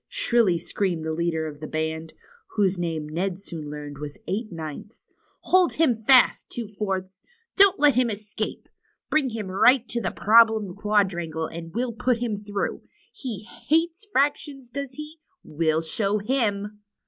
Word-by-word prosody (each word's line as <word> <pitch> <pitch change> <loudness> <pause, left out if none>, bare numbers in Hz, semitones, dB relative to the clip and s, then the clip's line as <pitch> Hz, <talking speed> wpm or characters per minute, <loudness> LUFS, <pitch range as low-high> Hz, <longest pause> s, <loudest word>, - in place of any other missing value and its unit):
shrilly 230 -8 +2
screamed 175 -2 -2
the 160 - -1
leader 160 -1 -1
of 150 -2 -7
the 155 - -6
band, 160 0 -3 0.4
whose 195 -4 +2
name 165 -3 -2
Ned 175 +4 -2
soon 165 -6 -7
learned 145 -1 -7
Avas 145 0 -7
Eight 215 +2 -2
Ninths, 165 +6 -8 0.3
Hold 370 -1 +4
him 305 -7 +3
fast. 240 +3 +4
Two 235 -3 -5
Fourths. 195 -2 -4 0.3
Don't 395 -1 +6
let 295 -1 +6
him 250 0 +2
escape. 210 0 -5 0.4
Bring 295 -4 +3
him 220 -3 -4
right 210 +7 +5
up 235 - -32
to 235 0 -1
Problem 220 -3 +4
Quadrangle, 190 -6 0
and 165 +1 -7
we'll 240 0 -1
put 245 +2 +1
him 235 -3 -2
through. 205 0 -3 0.3
He 225 -7 -6
Hiates 330 - -1
' - - -39
fractions, 275 -4 0
does 280 0 -5
he? 300 +3 -9 0.2
We'll 160 +1 0
show 200 +5 0
him!" 210 -3 -1
205 Hz, 160 wpm, -25 LUFS, 170-245 Hz, 0.4 s, Don't